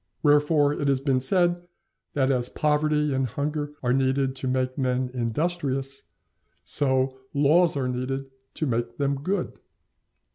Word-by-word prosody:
Wherefore 145 0 +4
it 145 -1 -2
has 135 -1 +2
been 135 -1 +1
said 175 +5 +2 0.5
that 135 -1 +2
as 125 -2 0
poverty 150 -1 +1
and 135 -1 0
hunger 145 +4 -3
are 125 0 +2
needed 135 0 +1
to 130 - -3
make 130 0 0
men 130 -1 -1
industrious, 135 +2 -2 0.6
so 130 -2 +1 0.2
laws 155 +3 +4
are 130 -2 -1
needed 130 +2 -3 0.2
to 155 - -1
make 120 -2 -2
them 140 -1 -1
good. 185 +4 -2
135 Hz, 140 wpm, -25 LUFS, 130-150 Hz, 0.6 s, Wherefore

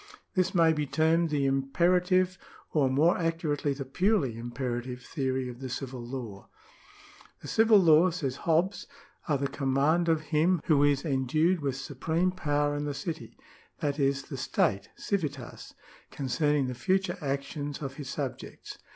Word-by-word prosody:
This 185 -2 +1
may 165 -2 +5
be 150 -2 -2
termed 160 +4 +2
the 145 -2 0
imperative 180 +7 +2 0.3
or 140 -4 +2
more 155 +8 +3
accurately 165 -4 -1
the 135 0 -6
purely 165 - +1
imperative 120 +1 -4
theory 130 -3 -2
of 125 -1 -8
the 130 -1 -6
civil 130 -1 -5
law. 120 -6 -7 0.5
" - - -23
The - - -7
civil 220 -1 +5
laws," 170 -1 +5
says 140 -6 -3
Hobbes,^^ 170 +4 0 0.2
" 280 - -22
are 145 - +3
the 140 +1 -1
command 140 +5 +1
of 160 -1 +2
him, 170 +4 +3
who 145 -3 +3
is 145 0 +2
endued 155 +6 +1
with 140 -3 -2
supreme 160 +7 -1
power 145 -4 0
in 145 0 -2
the 145 -1 -3
city 165 0 -6 0.2
" - - -32
(that 145 0 -1
is, 140 0 +1
the 135 - -7
state, 100 -5 0
civitas) 145 - -4 0.2
" - - -23
concerning 145 +1 0
the 125 - -3
future 185 +8 0
actions 140 +1 -3
of 135 -2 -6
his 140 -3 -7
subjects." 140 -3 -6
145 Hz, 165 wpm, -29 LUFS, 135-165 Hz, 0.5 s, may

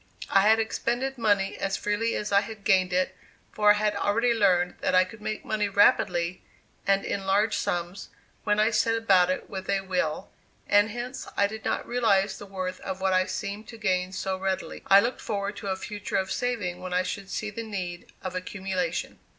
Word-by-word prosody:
I 195 - +6
had 220 +1 +6
expended 240 +4 -1
money 205 -3 +2
as 195 0 -1
freely 210 +3 -1
as 210 - -3
I 200 0 +5
had 215 0 -9
gained 185 -2 +3
it, 185 +1 0 0.4
for 210 -1 +3
I - - +9
had 210 0 0
already 230 +4 +2
learned 180 -5 +2
that - - +1
I 185 - +7
could 210 +4 -11
make 215 0 -4
money 210 -1 0
rapidly 180 -3 +3 0.5
and 195 0 +3
in 195 -1 -3
large 205 +3 +2
sums, 175 +2 -3 0.3
when 210 0 +1
I 215 +2 +4
set 225 +1 +2
about 190 -5 +4
it 185 - -2
with 190 -1 -7
a 195 -1 +2
will, 180 -5 -2 0.4
and 205 +1 +4
hence 240 +4 -6
I 200 - +4
did 220 +2 -5
not - - -1
realize 200 -5 +2
the 205 - -9
worth 185 -1 -4
of 190 -1 -5
what 190 0 +1
I 185 0 +3
seemed 205 +2 -5
to 230 - -10
gain 185 -4 0
so 190 0 -2
readily. 190 0 -3
I 195 - +8
looked 240 +4 -2
forward 200 -1 -3
to 200 - -6
a 190 - 0
future 205 +1 -4
of 190 -1 -1
saving 205 -8 -2
when 180 0 -4
I 180 - +3
should 195 +1 -5
see 215 +1 -3
the 230 - -5
need 185 -6 -6
of 185 -1 -4
accumulation. 185 -2 -3
200 Hz, 205 wpm, -27 LUFS, 185-215 Hz, 0.5 s, I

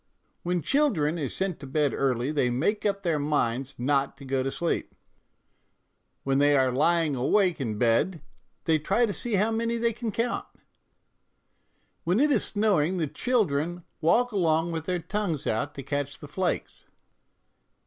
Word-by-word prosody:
" - - -45
When 175 -2 -1
children 175 - +1
are 140 -4 -2
sent 190 -3 -3
to 140 - -9
bed 145 +1 +1
early 130 0 0
they 140 -5 +1
make 200 - 0
up 200 -1 -2
their 165 -4 +1
minds 135 -2 -1
not 135 +2 0
to 140 - -11
go 135 0 0
to 135 - -1
sleep; 170 +4 -2 1.3
when 135 0 +1
they 145 0 +4
are 130 -1 +3
lying 160 +2 +2
awake 170 +6 +2
in 110 -5 -2
bed 125 - +2 0.5
they 160 -1 +3
try 235 +10 +2
to 205 - -3
see 235 0 -2
how 210 +4 +2
many 230 +1 0
they 230 0 +1
can 225 0 -4
count/' 230 +3 -2 0.8
" - - -45
When 180 +6 +1
it 295 +2 +4
is - - +3
snowing 190 -5 +1
the 165 - +1
children 175 - 0 0.2
walk 240 +10 +3
along 165 -4 +1
with 160 -1 -4
their 180 +1 0
tongues 180 -3 -3
out 140 +7 -1
to 135 - -6
catch 140 +1 -3
the 150 - -10
flakes." 180 +5 -3
160 Hz, 170 wpm, -27 LUFS, 140-200 Hz, 1.3 s, they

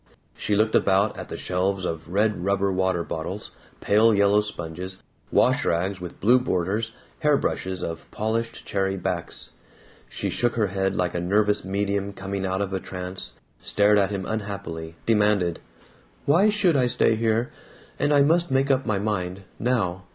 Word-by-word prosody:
She 105 - -1
looked 110 +1 +2
about 100 +2 +3
at - - -6
shelves 95 +1 -1
of 80 -1 -4
red 100 -2 +1
rubber 100 0 +1
water 95 -2 +1
bottles, 80 0 -5 0.3
pale 110 +2 +4
yellow 100 +1 +4
sponges, 95 -2 -5 0.3
wash - - +3
rags 95 +3 0
with 90 - -8
blue 120 +5 +5
borders, 105 0 -1 0.3
hair 150 -2 +3
brushes 95 -7 -2
of 80 -1 -5
polished 115 +2 -2
cherry 95 -1 -1
backs. 85 -2 -3 0.6
She - - -3
shook 120 -1 0
her 110 -4 +1
head 95 0 0
like 90 -1 0
a 85 - -2
nervous 105 +3 +2
medium 100 +1 -1
coming 100 0 -3
out 95 +2 0
of 100 -1 -5
a 95 - 0
trance, 90 0 -6 0.3
stared 105 0 +3
at 100 - +2
him 100 -2 -3
unhappily, 100 -7 -5
demanded: 105 -6 +2 0.7
"Why 175 +9 +5
should 200 -6 +2
I 130 -3 +3
stay 115 - +3
here? 115 +1 0 0.5
And 145 - +2
I 145 -1 +6
must 170 +4 +3
make 135 +1 +2
up 135 0 +1
my 105 - +1
mind. 95 -2 -2 0.2
Now. 100 -7 0
100 Hz, 165 wpm, -25 LUFS, 95-110 Hz, 0.7 s, I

